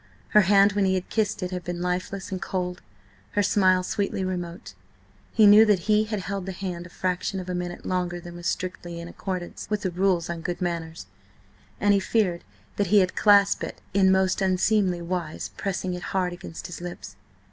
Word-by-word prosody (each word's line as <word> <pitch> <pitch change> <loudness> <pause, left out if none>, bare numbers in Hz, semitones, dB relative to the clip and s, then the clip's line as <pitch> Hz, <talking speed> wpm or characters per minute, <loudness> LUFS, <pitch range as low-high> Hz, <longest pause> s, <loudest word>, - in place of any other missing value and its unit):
Her 210 - +6
hand 200 +1 +5
when 200 -1 +2
he 190 0 +2
had 185 0 -4
kissed 215 -3 0
it 180 - -3
had 180 -1 -4
been 175 0 -4
lifeless 180 +2 -3
and 190 0 -3
cold, 180 -1 -3 0.5
her 205 - +2
smile 185 -2 +3
sweetly 195 0 -2
remote. 180 +1 -5 0.6
He 220 - +5
knew 210 +2 +9
that 205 -4 +3
he 215 +2 +2
had 215 -2 -3
held 195 0 -4
the 190 - -3
hand 180 -2 -5
a - - -17
fraction 185 +2 -2
of 185 - -7
a 180 - -3
minute 175 0 -5
longer 180 -1 -1
than 175 0 -10
was 175 0 -5
strictly 175 -2 -4
in 170 - -7
accordance 180 0 -5
with 210 -1 -1
the 185 - -1
rules 180 -1 +1
on 170 -1 -4
good 175 +1 -3
manners, 165 - -3 0.7
and 205 0 +4
he 200 - +4
feared 190 -4 0 0.3
that 205 - +1
he 210 - +4
had 185 -2 +3
clasped 200 -2 +5
it - - -6
in 190 -1 +5
most 190 0 +2
unseemly 185 -1 +2
wise, 170 -3 -4
pressing 185 -2 -2
it 180 - -5 0.2
hard 180 -1 0
against 175 -2 -9
his 175 -2 -7
lips. 175 0 -8
185 Hz, 200 wpm, -25 LUFS, 175-195 Hz, 0.7 s, knew